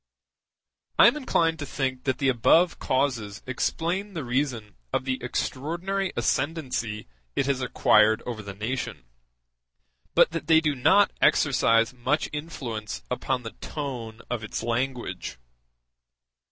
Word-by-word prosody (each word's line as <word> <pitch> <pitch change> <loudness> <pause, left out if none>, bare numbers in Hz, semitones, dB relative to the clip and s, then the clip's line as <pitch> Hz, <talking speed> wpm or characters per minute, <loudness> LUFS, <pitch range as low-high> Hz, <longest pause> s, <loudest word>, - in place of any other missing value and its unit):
I - - +8
am - - +6
inclined 165 - +1
to 145 - -4
think 130 -2 -3
that 130 -2 +1
the 135 - 0
above 145 +8 +4
causes 125 -6 -1
explain 175 +9 -2
the 160 - -3
reason 125 -4 -2 0.2
of 130 0 -1
the 130 -1 -2
extraordinary 170 +10 -2
ascendency 125 - -1 0.3
it - - +1
has 135 -1 0
acquired 110 -3 +4
over 120 -3 -4
the 100 -1 -8
nation, 110 - -4 1.1
but - - +6
that 165 - -4
they 160 -1 +6
do 155 -2 +1
not 160 +10 +4
exercise 115 -4 +3
much 130 +5 -1
influence 130 -8 -5
upon 125 0 -1
the 115 - -6
tone 120 -7 -5
of 120 -3 -3
its 110 - -4
language. 120 - -3
130 Hz, 130 wpm, -26 LUFS, 115-155 Hz, 1.1 s, I